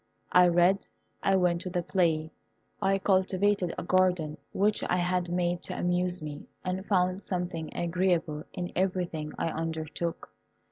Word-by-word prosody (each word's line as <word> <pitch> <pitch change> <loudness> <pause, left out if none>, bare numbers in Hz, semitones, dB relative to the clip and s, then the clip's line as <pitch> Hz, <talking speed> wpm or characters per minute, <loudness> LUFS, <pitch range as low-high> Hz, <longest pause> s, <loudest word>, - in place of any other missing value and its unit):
I 180 0 +7
read, 175 +3 +3 0.3
I 195 - +3
went 175 -2 +2
to 185 - -4
the 175 -1 -1
play, 160 -4 +1 0.5
I 195 0 +3
cultivated 190 -1 +2
a - - -3
garden 180 -4 +2
which 210 +2 +1
I 180 - +2
had 180 0 0
made 175 0 0
to - - -5
amuse 180 -1 0
me, 150 -1 -7 0.2
and 185 +1 -2
found 185 -1 +2
something 175 -4 -3
agreeable 170 -3 0
in 180 0 -4
everything 175 -5 -1
I - - 0
undertook. 160 +1 -4
180 Hz, 145 wpm, -29 LUFS, 170-185 Hz, 0.5 s, I